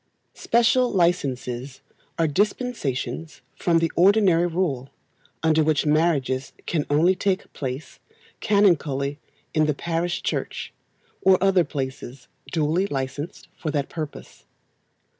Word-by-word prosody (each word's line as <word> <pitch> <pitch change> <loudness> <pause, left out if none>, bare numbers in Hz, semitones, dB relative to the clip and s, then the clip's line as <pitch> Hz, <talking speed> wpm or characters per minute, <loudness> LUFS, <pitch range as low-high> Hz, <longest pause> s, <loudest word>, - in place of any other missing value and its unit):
Special 240 +2 +3
licences 135 -7 -1 0.4
are 165 - +2
dispensations 155 - -2
from 170 -2 +2
the 165 -1 +1
ordinary 185 -2 +4
rule, 160 -7 -1 0.5
under 160 -1 +4
which 155 -1 +1
marriages 150 -4 +1
can 155 -4 -1
only 160 +6 +4
take 190 +1 -2
place 135 +1 -6 0.4
canonically 150 -9 +2 0.3
in 155 -1 +3
the 150 - +1
parish 170 +2 -2
church, - - -3 0.5
or 190 -1 +5
other 190 -1 +4
places 135 -3 -6 0.2
duly 165 +4 +1
licensed 140 +1 -5
for 160 - -4
that 145 -2 -1
purpose. 155 -3 -8
160 Hz, 110 wpm, -24 LUFS, 140-180 Hz, 0.5 s, or